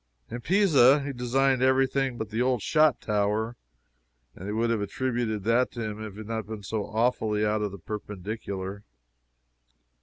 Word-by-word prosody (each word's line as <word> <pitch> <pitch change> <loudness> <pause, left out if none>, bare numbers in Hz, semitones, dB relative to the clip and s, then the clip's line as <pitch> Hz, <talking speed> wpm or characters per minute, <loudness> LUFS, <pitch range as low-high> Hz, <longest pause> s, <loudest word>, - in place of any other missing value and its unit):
In 120 - -5
Pisa 150 - +5
he 140 0 -4
designed 130 +1 +1
every 130 +1 +4
thing 135 -1 -1
but 110 -2 -5
the 110 +3 -1
old 125 -3 +1
shot 155 -3 +3
tower, 105 +2 0 0.8
and 95 - -8
they - - -2
would 115 +2 0
have 110 -3 0
attributed 115 0 -2
that 115 +4 +2
to 120 - -4
him 110 0 -5
if 110 -2 -7
it - - -14
had - - -12
not 110 -1 -3
been 110 -2 -7
so 105 +1 -3
awfully 110 -2 +1
out 105 0 0
of 105 -1 -2
the 100 - -8
perpendicular. 100 0 -6
110 Hz, 180 wpm, -27 LUFS, 105-130 Hz, 0.8 s, Pisa